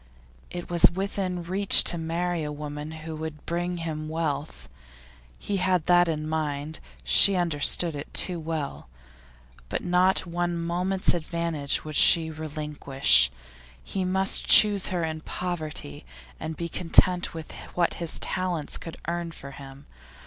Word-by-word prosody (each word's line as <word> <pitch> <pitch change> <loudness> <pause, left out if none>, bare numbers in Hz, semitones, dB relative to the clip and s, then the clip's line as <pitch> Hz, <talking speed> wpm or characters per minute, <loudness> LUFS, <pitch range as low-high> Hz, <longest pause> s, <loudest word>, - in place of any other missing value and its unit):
It 175 -1 -7
was 175 -1 +5
within 190 -1 -3
his 170 -1 -8
reach 195 +1 +5
to - - +3
marry 170 +1 -2
a 150 -1 -4
woman 150 0 -7
who 160 0 -8
would 155 -1 -7
bring 175 +1 -3
him 155 -2 -5
wealth. 155 -2 -4 0.7
He 200 - -3
had 180 -3 0
that 175 0 +4
in 155 -2 -3
mind; 155 -1 -2 0.2
she 130 - +5
understood 170 -1 0
it 145 - -8
too 180 -2 0
well. 155 - -5 0.8
But - - -3
not 180 +2 +2
one 175 0 -2
moment's 180 +3 0
advantage 165 -4 -2
would 155 -1 -7
she 160 -1 +6
relinquish. 150 - +1 0.5
He 195 - -3
must 190 +2 +1
choose 205 -2 +7
her 180 -2 -2
in 160 -1 -3
her 155 - -13
poverty, 155 - -5 0.4
and 160 0 -6
be 170 - -4
content 180 +1 +2
with 160 -1 -8 0.2
what 175 -1 +1
his 170 - +5
talents 180 -5 -2
could 165 0 -9
earn 170 0 -3
for 140 -3 -10
him. 140 0 -12
165 Hz, 150 wpm, -25 LUFS, 155-180 Hz, 0.8 s, choose